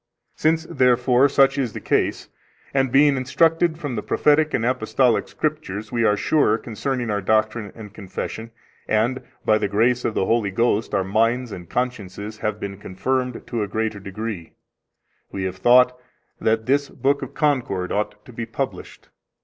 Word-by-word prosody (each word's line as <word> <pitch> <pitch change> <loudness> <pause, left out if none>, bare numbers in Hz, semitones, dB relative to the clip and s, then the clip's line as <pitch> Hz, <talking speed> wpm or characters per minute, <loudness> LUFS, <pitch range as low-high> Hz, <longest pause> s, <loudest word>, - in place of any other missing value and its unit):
Since, 160 +1 +1
therefore, 125 -2 +3
such 135 0 +4
is 125 -6 -1
the - - -5
case, - - 0 0.5
and 135 -2 +1
being 140 +1 +5
instructed 160 +5 +2
from 145 -7 -4
the 105 - -2
Prophetic 150 +6 +2
and 115 - 0
Apostolic 125 0 +1
Scriptures, 130 -9 -3
we 120 -2 0
are 105 -2 +3
sure 125 -7 +2
concerning 120 +1 -3
our 105 -1 -1
doctrine 110 +1 0
and 105 -3 -10
confession, 110 +3 -6 0.4
and 115 +4 +1 0.2
by 110 0 +4
the - - 0
grace 120 +5 +2
of 110 - -1
the - - +1
Holy 115 -2 +1
Ghost 110 +1 0
our 95 - +2
minds 115 +5 +1
and 90 -3 -9
consciences 110 -4 -4
have 105 0 -2
been 100 -1 -5
confirmed 125 +7 -2
to 120 -2 -3
a 105 - -1
greater 110 +1 -2
degree, 100 -2 -6 0.8
we 95 - -4
have 95 0 -3
thought 125 +4 +5 0.4
that 110 0 +1
this 140 +2 +1
Book 140 +1 0
of 135 - -7
Concord 125 - 0
ought 105 0 -3
to 125 - -13
be 115 0 -5
published. - - -6
115 Hz, 165 wpm, -22 LUFS, 105-130 Hz, 0.8 s, being